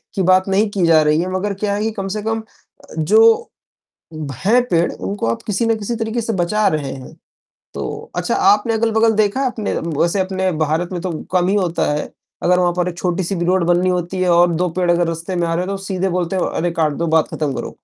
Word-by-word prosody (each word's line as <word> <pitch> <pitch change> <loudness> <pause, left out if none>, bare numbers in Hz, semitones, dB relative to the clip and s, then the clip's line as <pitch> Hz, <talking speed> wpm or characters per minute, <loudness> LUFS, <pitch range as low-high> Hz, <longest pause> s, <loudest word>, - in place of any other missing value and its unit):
की 195 - 0
बात 185 +1 +4
नहीं 205 +2 +2
की 190 -4 +1
जा 160 -1 +6
रही 150 +2 +2
है, 185 +1 -3
मगर 200 +2 -1
क्या 200 +1 -2
है 205 - -2
कि 225 - 0
कम 195 -2 -5
से 210 - -3
कम 225 0 -2 0.6
जो 225 - +4 0.9
हैं 240 +5 +4
पेड़ 170 0 +2
उनको 200 - -4
आप 115 - -2
किसी 210 +2 0
ना 225 - +3
किसी 220 +2 -4
तरीक़े 225 +1 -2
से 225 - -2
बचा 210 +4 +1
रहे 145 -3 -2
हैं, 130 -1 -10 0.6
तो - - -6
अच्छा - - -1
आपने 215 +3 +3
अगल-बगल 225 0 +2
देखा 215 +4 +1
है 270 - +1
आपने 225 -4 -2
वैसे 170 +4 0
अपने 190 0 -1 0.2
भारत 165 +4 -1
में 175 - -3
तो 185 -2 -3 0.2
कम 180 0 +2
ही 200 - +2
होता 175 -6 0
है, 150 - -3 0.3
अगर 180 0 +3
वहाँ 175 -1 +2
पर 180 0 0
एक 175 0 -7
छोटी-सी 180 +1 -1
भी 170 0 -1
रोड 185 -1 +2
बननी 175 +1 +2
होती 180 +1 -2
है 180 - +2
और 175 0 +4
2 180 +2 0
पेड़ 180 -1 +2
अगर 170 0 +1
रास्ते 165 +3 -4
में 170 -1 0
आ 165 - 0
रहे 180 +2 -1
तो 195 0 -3
सीधे 190 0 -1
बोलते 180 +1 -1
हैं - - 0
अरे! 175 +1 -1
काट 160 -2 0
दो 170 +4 -2
बात 160 - +2
ख़त्म 150 -3 -1
करो। - - -6
185 Hz, 240 wpm, -18 LUFS, 170-205 Hz, 0.9 s, जा